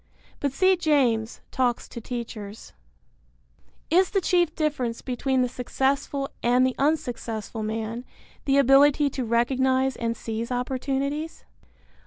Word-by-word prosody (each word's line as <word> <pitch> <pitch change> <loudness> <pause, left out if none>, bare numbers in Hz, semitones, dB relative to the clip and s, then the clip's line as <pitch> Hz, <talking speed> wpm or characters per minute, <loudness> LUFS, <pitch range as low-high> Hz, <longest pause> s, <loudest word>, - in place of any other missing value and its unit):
(But 280 - 0
see 375 +7 +4
James, 255 -9 +1
Talks 245 -2 0
to 235 - -8
Teachers.) 225 -3 -7 1.2
Is 370 +3 +4
the 395 - +1
chief 350 -3 +1
difference 275 -7 -1
between 260 0 0
the - - +1
successful 270 +3 -1
and 245 +2 +4
the 260 - +1
unsuccessful 240 -7 -1
man 220 +2 -3 0.4
the 275 0 +3
ability 280 +2 +5
to 260 - -3
recognize 260 +3 +1
and 230 -1 -2
seize 225 +2 -4
opportunities? 275 +5 -2
260 Hz, 120 wpm, -25 LUFS, 235-280 Hz, 1.2 s, ability